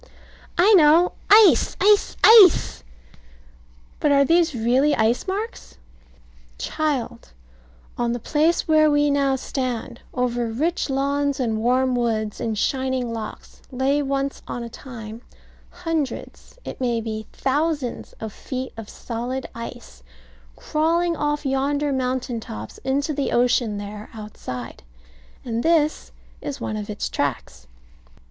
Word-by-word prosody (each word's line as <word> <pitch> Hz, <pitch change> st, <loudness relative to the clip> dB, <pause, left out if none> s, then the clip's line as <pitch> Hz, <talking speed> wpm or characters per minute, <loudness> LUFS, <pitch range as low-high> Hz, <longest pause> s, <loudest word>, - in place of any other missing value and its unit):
I 385 Hz, +5 st, +5 dB
know. 335 Hz, 0 st, +6 dB, 0.2 s
Ice! 405 Hz, -, +6 dB
ice! 415 Hz, +2 st, +3 dB
ice! 430 Hz, -7 st, +7 dB, 1.2 s
But 295 Hz, -, +2 dB
are 280 Hz, 0 st, +5 dB
these 335 Hz, -1 st, +3 dB
really 255 Hz, +6 st, +2 dB
ice 225 Hz, -, +1 dB
marks? 415 Hz, +5 st, -5 dB, 0.8 s
Child, 255 Hz, -, -3 dB, 0.7 s
on 240 Hz, -1 st, +1 dB
the 240 Hz, -, -1 dB
place 315 Hz, +7 st, +1 dB
where 310 Hz, -1 st, +5 dB
we 290 Hz, 0 st, +3 dB
now 275 Hz, -1 st, +2 dB
stand, 250 Hz, -3 st, -4 dB
over 245 Hz, -1 st, -1 dB
rich 295 Hz, +9 st, -1 dB
lawns, 280 Hz, +1 st, 0 dB
and 225 Hz, -4 st, -1 dB
warm 255 Hz, +2 st, +2 dB
woods, 220 Hz, -3 st, -1 dB
and 220 Hz, -2 st, -2 dB
shining 260 Hz, 0 st, -1 dB
lochs, 220 Hz, -2 st, -8 dB
lay 270 Hz, +3 st, +1 dB
once 275 Hz, 0 st, -2 dB
on 240 Hz, -, -5 dB
a 235 Hz, -, -7 dB
time 230 Hz, -3 st, -9 dB, 0.5 s
hundreds, 330 Hz, -, -5 dB
it -, -, -7 dB
may 240 Hz, -2 st, 0 dB
be 220 Hz, -1 st, -5 dB
thousands, 285 Hz, -2 st, -2 dB
of 220 Hz, -2 st, -8 dB
feet 260 Hz, 0 st, -6 dB
of 225 Hz, -2 st, -8 dB
solid 245 Hz, +3 st, -5 dB
ice, 230 Hz, -, -9 dB, 0.5 s
crawling 335 Hz, -, 0 dB
off 295 Hz, -1 st, -2 dB
yonder 280 Hz, +2 st, 0 dB
mountain 255 Hz, -2 st, -2 dB
tops 110 Hz, -, -9 dB
into 280 Hz, +3 st, -1 dB
the 280 Hz, -1 st, -2 dB
ocean 240 Hz, -3 st, +2 dB
there 205 Hz, +1 st, -8 dB
outside; 125 Hz, -, -8 dB, 0.6 s
and 230 Hz, -1 st, -2 dB
this 315 Hz, -1 st, +1 dB, 0.3 s
is 285 Hz, -, -5 dB
one 215 Hz, -, -4 dB
of 210 Hz, -1 st, -5 dB
its 210 Hz, -, -3 dB
tracks. 120 Hz, -, -4 dB
260 Hz, 125 wpm, -22 LUFS, 230-295 Hz, 1.2 s, ice